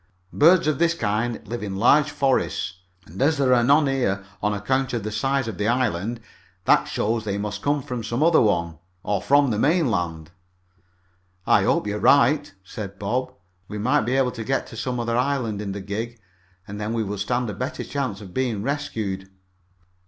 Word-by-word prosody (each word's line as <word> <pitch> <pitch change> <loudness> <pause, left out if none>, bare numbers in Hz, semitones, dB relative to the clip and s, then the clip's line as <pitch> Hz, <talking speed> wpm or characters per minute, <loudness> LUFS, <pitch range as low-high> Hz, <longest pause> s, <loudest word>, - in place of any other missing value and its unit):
Birds 170 +3 +5
of 155 -3 0
this 170 0 +3
kind 115 -1 -2
live 120 +3 -4
in 100 -2 -4
large 145 +9 +4
forests, 130 -10 0 0.3
and 90 +8 -9
as 150 +3 +3
there 135 -2 +3
are 120 -1 +4
none 145 +4 +5
here, 120 -8 0 0.2
on 105 - +1
account 130 +6 -1
of 115 -4 -2
the 110 - -4
size 135 +4 0
of 105 -4 -6
this 105 +2 +1
island, 115 -2 0 0.5
that - - +4
shows 115 +1 -1
they 100 -2 -2
must 105 0 -4
come 145 -1 0
from 125 -3 -5
some 120 +6 -1
other 165 0 +5
one, 85 -7 0 0.2
or 100 -2 -1
from 140 -2 +3
the 105 - -1
mainland." 90 - 0 1.1
"I - - +4
hope - - +2
you're 105 0 -2
right," 145 +3 +4
said 100 +1 -7
Bob. 120 +6 -2 0.4
"We 105 - -6
might 110 +5 +2
be 125 +4 0
able 130 -2 +2
to 115 -2 -6
get 135 +4 -1
to - - -10
some 125 +2 -3
other 115 0 -1
island 125 -5 0
in 100 -2 -4
the 100 +1 -5
gig, 110 +4 -5 0.5
and 105 +1 -7
then 105 +2 -2
we 115 -1 0
would 100 -1 -4
stand 120 +5 -1
a - - -7
better 130 +7 -4
chance 130 -8 -3
of 95 -3 -11
being 120 -6 -1
rescued." 110 -9 -3
115 Hz, 195 wpm, -23 LUFS, 105-135 Hz, 1.1 s, Birds